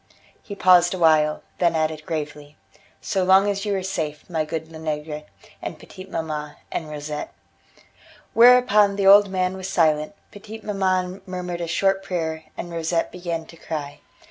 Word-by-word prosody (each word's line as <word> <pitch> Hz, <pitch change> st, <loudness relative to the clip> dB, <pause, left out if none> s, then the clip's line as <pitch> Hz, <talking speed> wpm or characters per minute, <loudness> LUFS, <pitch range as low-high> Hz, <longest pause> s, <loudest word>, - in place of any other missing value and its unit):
He 200 Hz, -, -8 dB
paused 180 Hz, -1 st, +5 dB
awhile, 155 Hz, -3 st, +3 dB, 0.2 s
then 170 Hz, -2 st, +2 dB
added 155 Hz, -1 st, -1 dB
gravely: 150 Hz, -1 st, -5 dB, 0.4 s
"So 190 Hz, -2 st, -1 dB
long 190 Hz, +2 st, +5 dB
as 200 Hz, 0 st, -1 dB
you 205 Hz, -1 st, 0 dB
are 190 Hz, -, -2 dB
safe, 155 Hz, -5 st, -4 dB
my 160 Hz, -3 st, -1 dB
good 160 Hz, +1 st, -5 dB
Lenegre, 150 Hz, -1 st, -5 dB, 0.4 s
and -, -, -6 dB
petite 185 Hz, +1 st, -12 dB
maman, 155 Hz, -3 st, -4 dB, 0.2 s
and 155 Hz, -, -4 dB
Rosette." 150 Hz, 0 st, -5 dB, 1.0 s
Whereupon 235 Hz, -4 st, +6 dB
the 200 Hz, -1 st, -1 dB
old 200 Hz, +1 st, +8 dB
man 185 Hz, 0 st, -1 dB
was 190 Hz, 0 st, -6 dB
silent, 155 Hz, 0 st, +1 dB, 0.2 s
petite 215 Hz, +1 st, -10 dB
maman 185 Hz, -2 st, -1 dB
murmured 180 Hz, -1 st, -5 dB
a 170 Hz, -, -3 dB
short 195 Hz, +3 st, +1 dB
prayer, 160 Hz, -4 st, -3 dB
and 175 Hz, -, -6 dB
Rosette 165 Hz, 0 st, -1 dB
began 170 Hz, -2 st, -4 dB
to 165 Hz, -, -15 dB
cry. 145 Hz, -3 st, -6 dB
175 Hz, 155 wpm, -23 LUFS, 155-190 Hz, 1.0 s, old